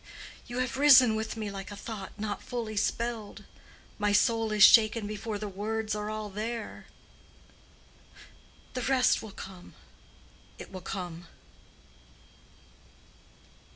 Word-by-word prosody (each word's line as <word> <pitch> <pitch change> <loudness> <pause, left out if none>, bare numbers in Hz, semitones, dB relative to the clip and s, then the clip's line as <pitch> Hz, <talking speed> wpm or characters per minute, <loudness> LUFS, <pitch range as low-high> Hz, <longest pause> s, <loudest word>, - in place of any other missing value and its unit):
You 240 0 -6
have 255 +1 -1
risen 265 -5 +7
within 220 +1 -4
me 210 -2 -3
like 195 -1 -7
a 205 - -7
thought 200 -2 -7
not 205 -1 -3
fully 230 -3 -5
spelled; 225 0 -2 0.6
my 210 0 +2
soul 225 +2 +2
is 210 -1 +5
shaken 220 -1 +7
before 210 +1 -4
the 210 +1 -5
words 215 +2 -3
are 210 0 -3
all 215 0 -4
there. 220 +2 -5 1.9
The 255 - -3
rest 260 0 +3
will 220 - -8
come—it 190 -2 -14
will 185 -1 -7
come." 175 -2 -6
215 Hz, 120 wpm, -29 LUFS, 205-230 Hz, 1.9 s, risen